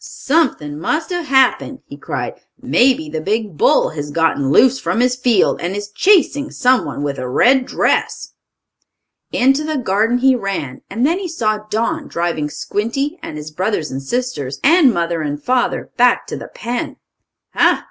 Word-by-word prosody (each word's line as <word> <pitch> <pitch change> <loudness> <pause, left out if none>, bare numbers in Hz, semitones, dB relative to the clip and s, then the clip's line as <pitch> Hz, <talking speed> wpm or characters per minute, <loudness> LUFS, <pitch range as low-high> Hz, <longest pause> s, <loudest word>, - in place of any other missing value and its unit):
"Something 255 - -1
must 320 - -2
have 350 -3 -3
happened!" 265 -2 +2
he - - -10
cried. - - -5 0.3
"Maybe 250 -10 +2
the 155 +1 -4
big 210 0 -2
bull - - +3
has 145 -2 -6
gotten 150 -3 0
loose 260 - +4
from - - -1
his 250 0 +2
field, 245 -5 +2
and 175 +3 -3
is 205 0 -6
chasing 305 - +2
someone 250 - 0
with 140 -1 -3
a 130 -1 -4
red 255 - +3
dress." - - -1 1.0
Into 270 +4 +2
the 310 -1 -2
garden 225 0 +1
he 260 +1 +3
ran, 195 - -4
and 230 +6 0
then 335 +5 +1
he 385 - -4
saw 215 -10 -1
Don 230 +9 -2
driving 170 -3 -2
Squinty, 275 - -3
and 150 - -7
his 150 +1 -8
brothers 180 -1 -2
and 135 +1 -4
sisters, 145 - -3
and 315 -2 +5
mother 170 -3 -1
and 145 -1 -3
father, 250 - -1
back 245 0 +3
to - - -6
the - - -8
pen. 240 +1 -5 0.6
"Ha! - - +3
230 Hz, 170 wpm, -18 LUFS, 160-265 Hz, 1.0 s, and